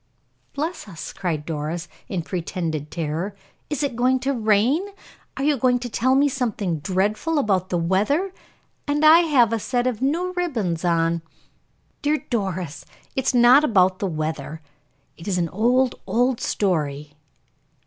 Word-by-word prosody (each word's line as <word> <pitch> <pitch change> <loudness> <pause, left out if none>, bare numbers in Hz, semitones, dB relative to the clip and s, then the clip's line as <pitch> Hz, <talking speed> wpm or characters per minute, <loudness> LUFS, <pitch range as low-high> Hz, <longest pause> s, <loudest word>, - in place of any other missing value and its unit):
"Bless 320 -1 -3
us!" 170 -6 -8
cried 170 -6 -3
Doris, 165 +2 -4 0.2
in 180 -4 -3
pretended 165 -3 -3
terror. 165 +5 -3 0.3
"Is 295 -1 -2
it 275 -4 -1
going 255 +2 +3
to 275 +1 0
rain? 225 - +2 0.5
Are 275 - -2
you 290 0 +2
going 250 +1 +3
to 245 0 -5
tell 260 +3 +2
me 280 +2 +4
something 220 - -2
dreadful 205 - 0
about 190 -8 +1
the 175 - 0
weather, 210 - +1 0.5
and 295 +1 +1
I 320 +2 +9
have 270 -10 +3
a 225 - 0
set 245 +3 -1
of 250 -3 -1
new 340 +7 0
ribbons 225 - -2
on!" 165 -1 +1 0.8
"Dear 295 +1 +2
Doris, 185 - -2 0.3
it 265 - -1
is - - +2
not 245 +4 +7
about 185 -8 +3
the 200 - -1
weather; 155 -1 -4 0.5
it 165 - -11
is 190 -3 0
an 170 -2 0
old, 245 +6 +2
old 245 +5 +1
story." 150 -6 -1
210 Hz, 155 wpm, -23 LUFS, 170-265 Hz, 0.8 s, I